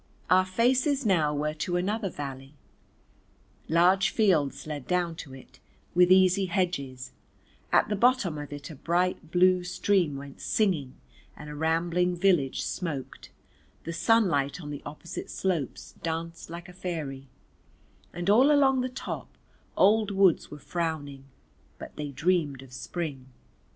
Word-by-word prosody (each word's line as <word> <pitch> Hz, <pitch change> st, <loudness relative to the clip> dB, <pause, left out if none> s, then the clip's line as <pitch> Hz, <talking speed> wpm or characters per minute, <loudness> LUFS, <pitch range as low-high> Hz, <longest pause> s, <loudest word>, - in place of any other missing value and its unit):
Our 185 Hz, 0 st, +5 dB
faces 255 Hz, +6 st, +2 dB
now 165 Hz, -7 st, +3 dB
were 150 Hz, +1 st, -1 dB
to 175 Hz, +3 st, -3 dB
another 200 Hz, +3 st, -1 dB
valley, 135 Hz, -2 st, -7 dB, 1.1 s
large 180 Hz, +4 st, +4 dB
fields 180 Hz, -11 st, +1 dB
led 150 Hz, -3 st, -6 dB
down 180 Hz, -2 st, 0 dB
to 135 Hz, -5 st, -9 dB
it, 130 Hz, -, -16 dB, 0.3 s
with 180 Hz, +1 st, +5 dB
easy 190 Hz, +1 st, +5 dB
hedges, 140 Hz, -9 st, -2 dB, 0.6 s
at -, -, +4 dB
the 210 Hz, -, -1 dB
bottom 205 Hz, -, +2 dB
of 145 Hz, -1 st, -7 dB
it 145 Hz, +1 st, -7 dB
a -, -, -9 dB
bright 170 Hz, +2 st, -1 dB
blue 180 Hz, +1 st, +4 dB
stream 180 Hz, -4 st, +1 dB
went 140 Hz, 0 st, -10 dB
singing 170 Hz, -12 st, 0 dB, 0.4 s
and 150 Hz, 0 st, -9 dB
a -, -, -7 dB
rambling 170 Hz, +3 st, +1 dB
village 175 Hz, -7 st, +2 dB
smoked, 150 Hz, -7 st, -5 dB, 0.5 s
the 165 Hz, -, -5 dB
sunlight 170 Hz, -6 st, +2 dB
on 150 Hz, -4 st, -7 dB
the 145 Hz, -, -6 dB
opposite 155 Hz, +3 st, -7 dB
slopes 175 Hz, -8 st, -3 dB
danced 165 Hz, 0 st, -4 dB
like 170 Hz, +1 st, -8 dB
a 180 Hz, -, -12 dB
fairy; 150 Hz, -7 st, -5 dB, 0.8 s
and 175 Hz, +1 st, -5 dB
all 250 Hz, +8 st, +6 dB
along 270 Hz, -3 st, +4 dB
the 255 Hz, -, -2 dB
top 255 Hz, -, -7 dB, 0.4 s
old 210 Hz, +2 st, +4 dB
woods 195 Hz, -4 st, +3 dB
were 150 Hz, -, -9 dB
frowning, 150 Hz, -4 st, -4 dB, 0.5 s
but -, -, -10 dB
they 150 Hz, -1 st, -4 dB
dreamed 145 Hz, -2 st, 0 dB
of 130 Hz, -2 st, -15 dB
Spring. 135 Hz, -1 st, -5 dB
170 Hz, 140 wpm, -27 LUFS, 145-190 Hz, 1.1 s, all